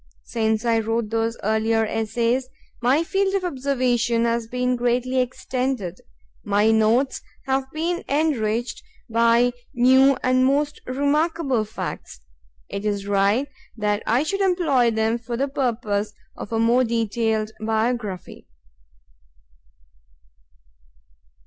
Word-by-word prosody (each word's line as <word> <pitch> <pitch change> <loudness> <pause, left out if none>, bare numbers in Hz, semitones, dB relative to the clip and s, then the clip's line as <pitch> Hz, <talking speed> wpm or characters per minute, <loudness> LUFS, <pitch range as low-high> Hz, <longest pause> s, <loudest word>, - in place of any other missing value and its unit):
Since 220 0 -1
I 230 -1 +3
wrote 225 0 -2
those 225 0 -1
earlier 220 +1 +1
essays, 230 +4 -1 0.3
my 265 +7 +3
field 390 +3 0
of 390 - 0
observation 255 -6 0
has 230 -1 0
been 250 +1 0
greatly 245 +1 0
extended. 250 -6 -2 0.4
My 205 +2 +3
notes 225 +5 +2 0.2
have 265 0 -1
been 335 +3 -2
enriched 245 -6 0 0.3
by 235 +2 +4 0.2
new 260 +2 +5
and 255 0 +3
most 290 +3 +1
remarkable 285 -2 0
facts. 215 - -7 0.5
It 200 - -5
is 205 -2 -2
right 200 +6 +2 0.3
that 210 0 0
I 240 +5 +3
should 390 +6 -2
employ 330 -11 +3
them 220 +1 0
for 235 0 -5
the 275 +3 0
purpose 225 -6 -1 0.2
of - - -8
a 225 - 0
more 235 +3 +3
detailed 225 -1 -1
biography. 220 -3 -2
235 Hz, 115 wpm, -23 LUFS, 220-265 Hz, 0.5 s, new